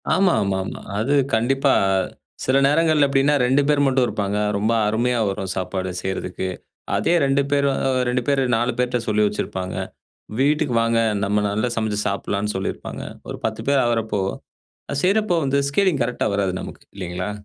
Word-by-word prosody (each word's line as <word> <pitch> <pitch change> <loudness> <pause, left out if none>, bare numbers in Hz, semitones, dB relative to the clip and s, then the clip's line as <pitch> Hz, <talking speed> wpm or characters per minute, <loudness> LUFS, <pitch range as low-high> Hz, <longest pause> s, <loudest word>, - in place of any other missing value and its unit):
ஆமா, 190 -2 +3
ஆமா, 100 -1 0
ஆமா. - - -7 0.2
அது 130 +6 +1 0.2
கண்டிப்பா. 135 +4 +2 0.7
சில 130 +1 +3
நேரங்கள்ல 155 -1 +3
எப்டின்னா, 140 +1 +3
2 135 +3 +3
பேரு 145 -1 +3
மட்டும் 130 -1 +3
இருப்பாங்க. 105 -1 -2 0.2
ரொம்ப 105 +3 +1 0.2
அருமையா 120 +3 +1
வரும், 95 0 -3
சாப்பாடு 95 0 -3
செய்யி 95 +1 -2
றதுக்கு. 95 0 -4 0.5
அதே - - +1
2 135 +1 +2
பேரு 140 -1 +3
அ - - 0 0.2
2 125 0 +1
பேரு 140 -2 +2
4 120 +2 +1
பேர்ட்ட 125 -1 0
சொல்லி 105 0 +2
வச்சிருப்பாங்க. 95 -2 -4 0.6
வீட்டுக்கு 145 -1 +2
வாங்க, 115 0 +2 0.2
நம்ம 105 +1 +1
நல்லா 110 +4 0
சமைச்சு 110 -2 -1
சாப்பிடலான்னு 100 +1 -2
சொல்லிருப்பாங்க. 95 - -4 0.3
ஒரு - - -5
10 110 0 -2
பேரு 140 -1 +4
ஆகறப்போ, 110 -4 0 0.7
அது 140 0 -1
செய்யிறப்போ 200 -2 +2
வந்து, 140 +1 +1
ஸ்கேலிங் 170 -3 +2
கரெக்ட்டா 125 -2 -1
வராது 95 -2 0
நமக்கு, - - -9
இல்லிங்களா? 90 +1 -4
120 Hz, 160 wpm, -22 LUFS, 100-140 Hz, 0.7 s, பேரு